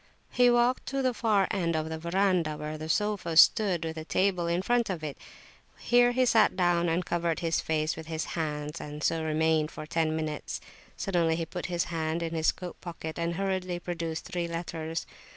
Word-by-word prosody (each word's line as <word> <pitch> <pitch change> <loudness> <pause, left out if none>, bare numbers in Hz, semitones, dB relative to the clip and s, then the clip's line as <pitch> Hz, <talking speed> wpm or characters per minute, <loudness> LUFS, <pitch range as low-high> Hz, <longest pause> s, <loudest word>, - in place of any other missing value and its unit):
He 245 0 +5
walked 240 +1 +2
to 275 0 -1
the 255 -1 +2
far 210 -4 +2
end 170 -5 0
of 160 0 -1
the 160 0 -4
verandah, 170 -2 +1
where 150 +1 -5
the 155 +1 -6
sofa 200 -4 0
stood, 185 -4 +5
with 160 0 -4
a 160 - -4
table 180 0 +1
in 170 +2 0
front 240 +1 +1
of 175 -4 -3
it. 150 -2 -4 0.6
Here 245 0 +4
he 255 +1 +2
sat 225 -5 +4
down 175 -2 +2
and 170 +2 0
covered 170 -1 -1
his 165 -1 +1
face 155 0 0
with 160 0 -9
his 160 -1 -3
hands, 150 -1 -3
and 150 +1 -7
so 165 -1 +1
remained 160 0 +2
for 155 - -8
ten 160 0 0
minutes. 155 -2 -3 0.4
Suddenly 170 -4 +1
he 165 0 -2
put 175 +2 -5
his 175 -1 0
hand 160 +1 -1
in 165 0 -3
his 160 -1 +2
coat 180 -1 -9
pocket 165 -2 -6
and 170 0 -1
hurriedly 185 -1 -1
produced 165 -2 -4
three 175 -1 -3
letters. 165 -1 -4
170 Hz, 200 wpm, -29 LUFS, 160-185 Hz, 0.6 s, He